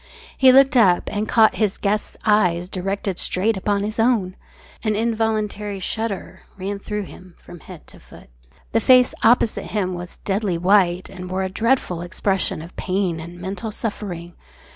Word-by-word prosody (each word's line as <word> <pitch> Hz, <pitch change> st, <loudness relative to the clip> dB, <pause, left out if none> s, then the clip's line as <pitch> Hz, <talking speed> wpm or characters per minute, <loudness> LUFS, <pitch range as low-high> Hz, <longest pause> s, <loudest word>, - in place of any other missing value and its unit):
He 260 Hz, -1 st, +6 dB
looked 270 Hz, +1 st, +5 dB
up 190 Hz, -8 st, +5 dB
and 210 Hz, +1 st, -2 dB
caught 220 Hz, -2 st, +4 dB
his 205 Hz, -3 st, +1 dB
guest's 210 Hz, +1 st, -2 dB
eyes 180 Hz, -5 st, +2 dB
directed 195 Hz, 0 st, -3 dB
straight 210 Hz, +5 st, 0 dB
upon 200 Hz, +1 st, -1 dB
his 215 Hz, +2 st, -4 dB
own. 225 Hz, -6 st, +2 dB, 0.5 s
An 215 Hz, -2 st, 0 dB
involuntary 215 Hz, -2 st, -1 dB
shudder 200 Hz, -1 st, -4 dB, 0.2 s
ran 200 Hz, +1 st, -4 dB
through 210 Hz, +1 st, -4 dB
him 185 Hz, -1 st, -13 dB
from 175 Hz, -, -13 dB
head -, -, -12 dB
to -, -, -15 dB
foot. -, -, -16 dB, 0.4 s
The 225 Hz, -, +2 dB
face 250 Hz, +1 st, +5 dB
opposite 230 Hz, -1 st, +3 dB
him 190 Hz, -4 st, -2 dB
was 175 Hz, 0 st, -8 dB
deadly 195 Hz, -3 st, 0 dB
white 180 Hz, 0 st, +3 dB
and 180 Hz, -1 st, -9 dB
wore 190 Hz, +1 st, -1 dB
a 190 Hz, -, -2 dB
dreadful 220 Hz, -4 st, 0 dB
expression 185 Hz, -1 st, -1 dB
of 170 Hz, -, -13 dB
pain 185 Hz, -3 st, -1 dB
and 170 Hz, +2 st, -9 dB
mental 195 Hz, +5 st, -5 dB
suffering. 190 Hz, -6 st, -5 dB
200 Hz, 165 wpm, -21 LUFS, 185-220 Hz, 0.5 s, He